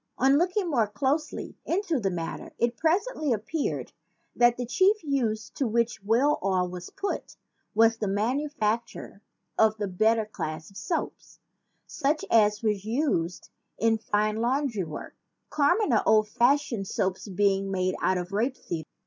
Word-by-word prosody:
On 270 +3 +4
looking 365 +2 0
more 240 -9 +2
closely 275 +9 -2
into 345 -5 0
the 200 -4 0
matter, 170 -3 -5
it 235 0 +1
presently 325 - 0
appeared 240 +8 -2 0.4
that 240 0 +4
the 245 - -3
chief 385 - +2
use 235 -7 -1
to 270 - -1
which 235 -2 0
whale 250 +8 +2
oil 185 -2 +1
was 180 0 -7
put 400 - -4 0.4
was 225 +1 +5
the 210 - -2
manufacture 230 -1 -2 0.4
of 220 0 +4
the 205 -1 -2
better 220 +4 +2
class 155 -5 -6
of 195 - -13
soap, 275 - -2 0.7
such 300 +1 -1
as 210 -1 +4
was 210 -3 0
used 220 - -1 0.3
in 225 0 +2
fine 215 0 0
laundry 240 -2 0
work, 155 -2 -8 0.4
commoner 290 - +3
old 215 -1 +5
fash 255 +7 +2
ioned 195 -5 -3
soap 185 0 -1 0.2
being 195 0 +2
made 185 -1 0
out 185 - +2
of 180 +1 -5
rape 235 +7 0
seed. 160 -3 -5
225 Hz, 150 wpm, -27 LUFS, 200-280 Hz, 0.7 s, was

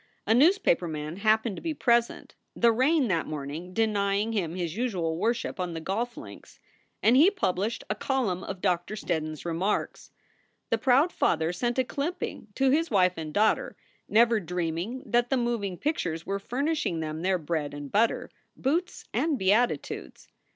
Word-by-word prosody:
A 220 - +3
newspaper 285 - +4
man 155 +1 -5
happened 220 0 +2
to - - -7
be 325 -2 -3
present 235 -3 +1 0.2
the 235 0 +4
rain 265 +4 +3
that 165 -4 0
morning 155 +4 -6
denying 205 0 +1
him 175 -6 -1
his 170 -2 -3
usual 190 -9 -1
worship 230 +3 -1
on 180 -2 -3
the - - -3
golf 225 +8 -3
links - - -11 0.4
and 230 - +5
he 310 +8 +7
published 220 - -1
a - - 0
column 240 -10 -1
of 195 -2 -6
Doctor 180 +1 0
Steddon 160 -6 -2
s 155 - -11
remarks. 175 +5 -2 0.6
The 230 - +2
proud 265 +8 +4
father 160 - +1
sent 240 +7 -1
a 260 - +3
clipping 290 0 -4
to 270 -1 +3
his 325 +4 +2
wife 185 -4 +3
and 155 -2 -5
daughter, 215 +6 +1 0.3
never 230 +1 +4
dreaming 180 +6 -3
that 240 0 +1
the 270 - +2
moving 230 -7 -1
pictures 170 - -2
were 200 0 -2
furnishing 265 - -1
them 155 0 -4
their 185 +1 +2
bread 155 -3 -2
and 145 -1 -8
butter, 225 +3 +1 0.2
boots 330 +7 -1
and 310 -3 +1
beatitudes. 215 +4 0
205 Hz, 165 wpm, -27 LUFS, 170-245 Hz, 0.6 s, he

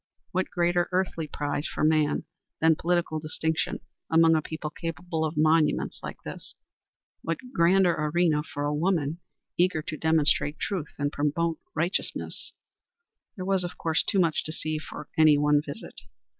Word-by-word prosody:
What 185 +1 -1
greater 175 0 +1
earthly 180 -3 -1
prize 145 +1 -2
for - - -3
man 155 -1 +3 0.4
than 160 0 +5
political 170 -1 0
distinction 160 +1 -2 0.3
among 165 0 +5
a 160 - +3
people 155 0 -5
capable 165 +1 -4
of 155 0 -2
monuments 155 0 +2
like - - -8
this? - - -8 0.7
What 165 -1 -2 0.2
grander 180 0 +4
arena 155 0 +2
for 145 -1 -5
a 145 0 0
woman 160 -1 0 0.4
eager 175 -3 +2
to 155 - -5
demonstrate 155 -1 +2
truth 180 -7 -3
and 145 0 -1
promote 160 +3 0 0.2
righteousness? 170 +5 -2 0.8
There 185 -4 -5
was, 190 -1 +2
of 175 - -6
course, 160 -2 +1
too 205 - 0
much 170 -4 +2
to 155 - -4
see 155 -1 -2
for 150 0 -9
any 155 -2 +7
one 150 0 +3
visit. 145 -2 -8
160 Hz, 155 wpm, -27 LUFS, 150-175 Hz, 0.8 s, any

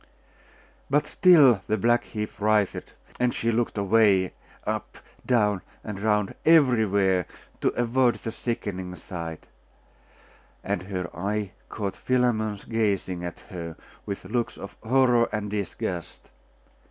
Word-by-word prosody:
But 145 +2 +3
still 150 - +6
the 110 - +1
black 120 +3 +2
heap 105 -1 -5
writhed; 105 -2 +1 0.3
and 125 -1 +1
she 115 - 0
looked 115 -1 -1
away, 100 -2 +3 0.3
up, - - -3 0.3
down, 105 -6 +2 0.2
and 105 -3 -6
round, 105 -1 +1
everywhere, 110 - +4 0.3
to - - 0
avoid 120 +1 +3
the 115 - -6
sickening 95 -6 -4
sight; 85 -1 -7 1.2
and 100 -3 -1
her 90 -2 -4
eye 100 +2 -2 0.2
caught 100 -3 -3
Philammon's 110 -5 0
gazing 100 -5 -1
at 85 -2 -6
her 85 -3 -6 0.3
with 100 - -5
looks 120 0 -2
of 100 - -9
horror 125 0 +3
and 105 -1 -3
disgust.... 95 -4 -4
105 Hz, 120 wpm, -26 LUFS, 95-120 Hz, 1.2 s, still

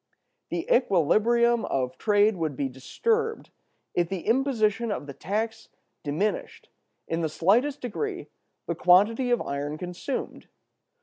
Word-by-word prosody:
"The 170 -1 -3
equilibrium 235 - +3
of 130 -1 -1
trade 210 0 +3
would 160 -5 -2
be 135 +1 -1
disturbed 450 - -2 0.4
if 175 -1 +1
the 190 -3 -3
imposition 230 -3 +1
of 175 - -3
the 140 - -8
tax 220 +7 -3 0.3
diminished, 160 +9 -2 0.4
in 165 +1 -1
the 160 - 0
slightest 240 - +2
degree, 370 - -4 0.4
the - - -1
quantity 210 +8 +4
of 240 - +2
iron 145 +2 -3
consumed. 180 - -5
210 Hz, 125 wpm, -26 LUFS, 165-240 Hz, 0.4 s, quantity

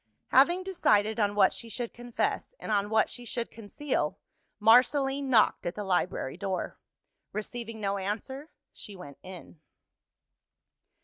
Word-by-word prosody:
Having 345 +8 +5
decided 220 - +2
on 205 -1 +2
what 195 -2 +5
she 230 - -7
should 235 +1 -4
confess, 240 - -2
and - - -5
on 205 -1 +1
what 220 0 +3
she 245 - -8
should 235 0 -4
conceal, 225 - -2 0.4
Marceline 270 +5 +4
knocked 225 -7 +4
at 175 - -3
the 210 - -4
library 180 -7 -1
door. 190 -2 -3 0.5
Receiving 225 +1 -5
no 200 -1 -1
answer, 265 +10 -4 0.2
she 205 - -7
went 145 -7 -11
in. 180 -3 -11
220 Hz, 135 wpm, -29 LUFS, 200-250 Hz, 0.5 s, Having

